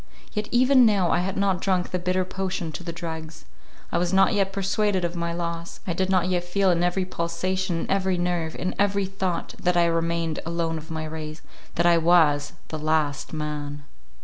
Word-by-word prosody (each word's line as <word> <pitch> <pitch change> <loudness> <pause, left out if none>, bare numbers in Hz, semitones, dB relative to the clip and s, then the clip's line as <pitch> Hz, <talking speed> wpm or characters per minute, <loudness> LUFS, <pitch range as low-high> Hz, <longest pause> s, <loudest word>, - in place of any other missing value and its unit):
Yet 210 -1 -2
even 255 +2 +5
now 200 -6 +3
I 175 - +3
had 185 +2 -2
not 195 -2 +1
drunk 185 -2 0
the 180 - -1
bitter 185 +1 0
potion 185 -2 -3
to 155 - -6
the 170 - -4
dregs; 160 -1 -7 0.5
I 170 - +1
was 175 0 0
not 195 +3 +4
yet 195 -2 +1
persuaded 195 -1 0
of 170 +1 -3
my 170 0 -2
loss; 170 0 -4
I 175 - -1
did 185 +2 -1
not 185 -2 +3
yet 180 -1 0
feel 190 +2 +2
in 170 0 +1
every 180 +1 +1
pulsation, 175 0 -2
in - - -4
every 190 -1 +1
nerve, 175 -2 -1
in 185 - -2
every 200 -1 +2
thought, 190 -3 -3
that 180 0 +2
I 170 - +5
remained 165 -1 0
alone 165 -1 -2
of 155 - -13
my 160 -1 -3
race,—that 155 +2 -5
I 170 -1 +5
was 160 -4 +4 0.2
the 155 - -4
LAST 155 -2 0
MAN. 150 -2 -4
175 Hz, 200 wpm, -25 LUFS, 165-190 Hz, 0.5 s, even